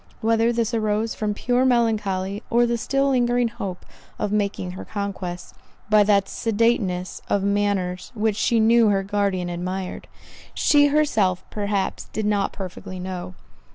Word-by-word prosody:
Whether 225 +1 +3
this 235 0 -1
arose 215 0 0
from 210 -1 -2
pure 245 +3 +1
melancholy, 210 -5 +1
or 240 +1 +4
the 235 0 0
still 275 +4 0
lingering 245 -2 +2
hope 200 -6 -6 0.3
of 205 - -2
making 200 -3 -1
her 185 - -8
conquest, 195 -4 -5 0.4
by 210 0 +7
that 200 -1 +3
sedateness 210 -5 0
of 200 - +1
manners 200 -3 -1
which 215 -1 +1
she 230 +2 +2
knew 230 +1 +5
her 195 -1 +1
guardian 195 -3 -1
admired, 180 +2 -4 0.5
she 290 -1 +5
herself 220 -12 +1
perhaps 205 -2 -2
did 215 - -2
not 205 -1 +1
perfectly 185 -1 -7
know. 180 0 -6
205 Hz, 145 wpm, -23 LUFS, 190-230 Hz, 0.5 s, by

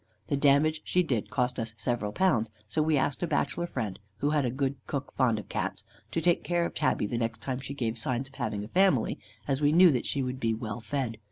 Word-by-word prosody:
The - - +2
damage 145 +3 +3
she 180 - +2
did 125 -10 -1
cost 125 0 0
us 115 -1 -4
several 115 -3 -1
pounds; 115 - +2 0.2
so 105 +9 0
we 155 -1 +3
asked 140 +1 0
a 175 - 0
bachelor 170 +2 0
friend, 110 - -4 0.2
who 145 - +1
had 150 -3 +2
a - - +1
good 135 +2 -1
cook, 140 -1 -4
fond 125 -4 +3
of 105 - -7
Cats, - - -3 0.3
to - - -1
take 175 +1 +2
care 175 -1 +1
of - - -4
tabby 130 -7 +1
the 115 +3 -2
next 115 -2 -2
time 130 +1 -2
she 135 +1 -6
gave 115 -3 -1
signs 130 +3 -1
of 135 - -20
having 110 -6 -3
a - - -7
family, 185 - +3 0.3
as 135 +1 0
we 145 0 +4
knew 175 +2 +7
that 125 -4 -1
she 140 - 0
would 130 0 -3
be 115 -3 +1
well 110 -1 -5
fed. 115 0 -3
130 Hz, 245 wpm, -29 LUFS, 115-150 Hz, 0.3 s, knew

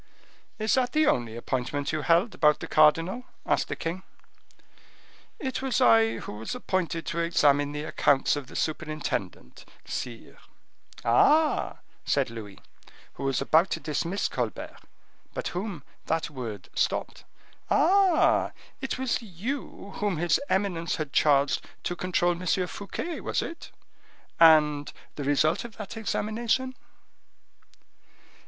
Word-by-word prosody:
"Is 215 0 0
that 255 -2 +1
the 310 0 +4
only 120 - +1
appointment 130 +3 -2
you 155 -1 -1
held 170 - +3
about 150 -1 +3
the - - -6
cardinal?" 165 +10 +3 0.2
asked - - +1
the - - -3
king. 170 +3 -4 1.4
"It 260 -2 -3
was 265 -4 0
I 115 -1 +5
who 105 - -7
was 110 - -5
appointed 180 -8 -2
to 170 - -3
examine 145 -4 +3
the 150 0 -4
accounts 145 -3 +2
of 145 -3 -6
the - - -12
superintendent, 155 - -3 0.2
sire." 120 -3 -6 0.7
"Ah!" 300 - +3 0.2
said 135 -4 +1
Louis, 105 -4 -9 0.6
who 135 - -6
was 135 -3 0
about 165 +4 +4
to - - -2
dismiss 165 +6 -1
Colbert, - - -4 0.6
but - - -2
whom 180 -4 -5 0.2
that 160 -1 -1
word 115 -8 -7
stopped; - - -1 0.5
"ah! 370 +1 +4 0.3
it 270 - -3
was 260 -2 -1
you 210 +1 -6
whom 205 -4 -1
his 170 - +2
eminence 180 -4 0
had 150 -4 -5
charged 140 -2 +3 0.2
to 175 - -2
control 175 -1 +1
M. 175 +1 -5 0.2
Fouquet, 200 - -5
was - - -1
it? 335 - -8 0.7
And 150 -3 +5 0.2
the 145 - -4
result 155 +3 +2
of 235 -2 -10
that 210 +1 -7
examination?" 225 +4 -1
165 Hz, 130 wpm, -27 LUFS, 145-210 Hz, 1.4 s, I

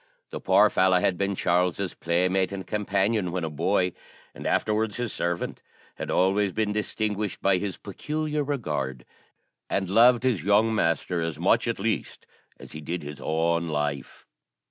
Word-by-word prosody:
The - - -6
poor 100 +3 +5
fellow 95 0 +4
had 90 - +1
been 100 +1 -1
Charles's 90 +1 0
playmate 90 +3 0
and 95 -1 -5
companion 100 -2 0
when 90 -1 -2
a 80 - -3
boy, 90 +4 +1 0.4
and - - -6
afterwards 110 -1 0
his 120 -2 -3
servant; 85 0 -3 0.4
had - - -5
always 95 +2 +2
been 105 +1 -1
distinguished 105 -1 -2
by 95 -2 +2
his 100 -1 -4
peculiar 150 +8 -3
regard, 75 - -3 0.6
and 95 -2 -1
loved 120 +3 +6
his 125 -8 +1
young 105 +3 +3
master 85 -3 0
as 80 -1 -3
much, - - +2
at - - -1
least, - - -2 0.3
as - - -11
he 75 - -8
did 85 +3 -4
his 75 -1 -8
own 85 +3 0
life. 75 -3 -3
95 Hz, 160 wpm, -26 LUFS, 85-105 Hz, 0.6 s, loved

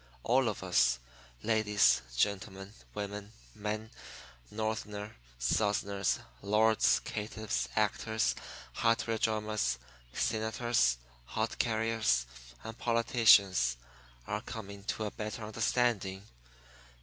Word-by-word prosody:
All 125 0 +3
of 105 - -5
us 90 -8 +3 0.5
ladies, 110 -2 +4 0.2
gentlemen, 95 - -1 0.2
women, 105 0 -5 0.2
men, 105 +1 -4 0.6
Northerners, 105 -1 -3 0.3
Southerners, 100 - +1 0.2
lords, 110 +2 +3
caitiffs, 105 - -3
actors, 110 -1 +1 0.4
hardware 115 -1 +1
drummers, 110 - 0 0.3
senators, 110 - +1 0.3
hod 110 - -2
carriers, 110 - +1 0.4
and 115 - -7
politicians 105 - +4 0.5
are 105 +9 -2
coming 100 -4 -8
to 110 - -2
a 105 - -3
better 110 +1 -5
understanding. 110 -3 0
105 Hz, 90 wpm, -32 LUFS, 100-110 Hz, 0.6 s, ladies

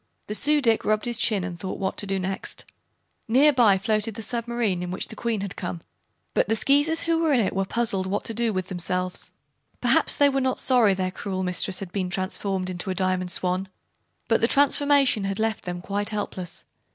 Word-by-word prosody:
The 210 - -5
Su 295 +6 +2
dic 225 -2 +3
rubbed 215 0 +1
his 240 -1 -1
chin 210 -7 +2
and 175 -1 -6
thought 190 - -4
what 190 -1 -2
to 205 - -3
do 195 0 0
next. 190 +1 -3 0.6
Near 275 +6 +5
by 225 -7 +5
floated 215 +1 -1
the 225 - -6
submarine 235 -4 -2
in 180 - -4
which 185 - -3
the - - -8
Queen 225 -2 -2
had 200 -2 -5
come, 90 -3 -5 0.5
but - - +1
the 225 - +3
Skeezers 290 +7 +2
who 330 -1 +1
were 320 -3 +2
in 255 - +4
it 205 - 0
were 195 0 0
puzzled 200 -3 0
what 200 +2 -2
to 230 - -5
do 230 0 0
with 185 -2 -3
themselves. 180 0 -2 0.5
Perhaps - - +3
they 285 - +5
were 275 -1 +1
not 260 0 +2
sorry 235 -7 +4
their 185 -1 -2
cruel 190 -1 -4
mistress 185 +1 0
had 190 -3 -6
been 185 -1 -2
transformed 185 0 -2
into 180 +2 -4
a 185 - -1
Diamond 185 -1 0
Swan, 185 +2 0 0.6
but 225 - +2
the 230 - +4
transformation 280 -5 +3
had 195 0 -2
left 220 -1 -1
them 175 -1 -4
quite 205 +2 -2
helpless. 190 -4 -5
205 Hz, 210 wpm, -25 LUFS, 185-235 Hz, 0.6 s, Near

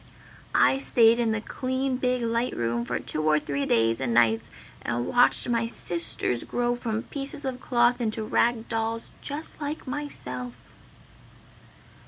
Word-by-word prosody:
"I 270 - +4
stayed 235 -3 +4
in 230 -2 +1
the 220 -1 -1
clean 260 +2 -2
big 250 -1 0
light 235 +2 -1
room 120 0 -1
for - - -2
two 155 - -2
or 155 0 +3
three 140 -1 -3
days 115 +1 +2
and 120 -3 -1
nights 115 -2 +3 0.3
and 120 +1 -2
watched 245 - +4
my 230 -1 0
Sisters 170 - 0
grow 240 0 -1
from 230 -2 -3
pieces 280 +1 -2
of 255 -1 -3
cloth 240 0 +2
into 220 -1 -1
rag 230 +1 +1
dolls 225 0 -3
just 300 +2 -6
like 295 +2 -4
myself!" 125 - -5
230 Hz, 150 wpm, -26 LUFS, -, 0.3 s, I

